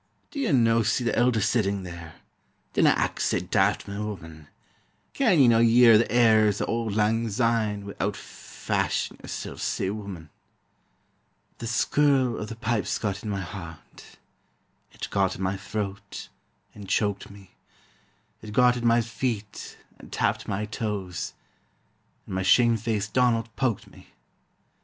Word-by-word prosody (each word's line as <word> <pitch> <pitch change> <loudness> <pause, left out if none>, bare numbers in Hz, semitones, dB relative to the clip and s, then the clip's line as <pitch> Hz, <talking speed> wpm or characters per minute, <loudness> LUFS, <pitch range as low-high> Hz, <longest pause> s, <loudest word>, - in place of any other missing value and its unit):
"Do 290 - -6
ye 265 -6 0
no 115 -3 +4
see 115 +3 0
the 115 - 0
elder 120 -2 +2
sitting 100 -3 0
there? 85 -3 -9 0.6
Dinna - - +4
act - - -1
sae - - +1
daft, 95 +3 +1
my 100 0 -5
wooman. 80 -8 -7 0.7
Can 225 -10 +3
ye 135 -4 +6
no 115 -1 +5
hear 115 0 +7
the 115 - 0
airs 110 -3 +4
o' - - 0
auld 115 -3 -2
lang 110 +2 +1
syne 110 -2 0
Wi'oot 100 0 -3
fashin' - - -3
yersel' - - -7
sae, 95 - -1
wooman?" 100 -7 -8 1.2
But - - -40
the 115 - -5
skirl 130 +1 +2
o' - - -3
the 110 - -7
pipes 115 -1 -1
got 100 -2 -3
in 110 - -6
my 100 -1 -2
heart, 90 -4 -10 0.7
It - - -6
got 100 -2 +1
in 95 - -5
my 95 +1 0
throat 100 0 -6 0.4
and 100 -2 -11
choked 100 0 0
me, 100 -2 -15 0.9
It 105 -1 -9
got 125 +2 +5
in 120 -1 -1
my 115 0 +4
feet, 115 -3 -4 0.2
and - - -14
tapped - - -1
my 100 +2 -2
toes, 105 -5 -4 0.9
And - - -8
my 95 - -1
shame 115 +5 +4
faced 105 -2 -2
Donald 115 -3 +1
poked 125 -6 -1
me. - - -17
105 Hz, 150 wpm, -26 LUFS, 100-115 Hz, 1.2 s, hear